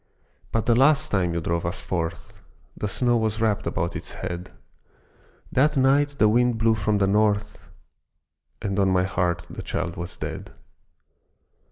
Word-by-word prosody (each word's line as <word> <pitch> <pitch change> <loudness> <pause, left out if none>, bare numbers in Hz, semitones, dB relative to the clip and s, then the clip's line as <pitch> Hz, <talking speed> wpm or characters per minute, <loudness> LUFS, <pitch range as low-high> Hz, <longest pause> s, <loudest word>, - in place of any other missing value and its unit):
But 115 - 0
the 120 - +4
last 140 +5 +4
time 90 -4 +1
you 85 - -1
drove 85 +1 -1
us 85 0 -3
forth, 85 -2 -4 0.3
The 105 - -3
snow 120 +3 +2
was 110 -1 -1
wrapped 110 -2 0
about 85 +2 -2
its - - -6
head, 90 +1 -6 1.0
That 150 +3 +2
night 140 +2 +3
the 110 - +5
wind 120 +2 +3
blew 110 0 +3
from 105 -1 0
the 100 - +2
North, 105 +1 0 0.9
And 100 -1 -1
on 95 -1 +3
my 90 -1 +3
heart 90 -2 -1
the - - -8
child - - -3
was 85 +1 -6
dead. - - -6
105 Hz, 160 wpm, -24 LUFS, 90-120 Hz, 1.0 s, the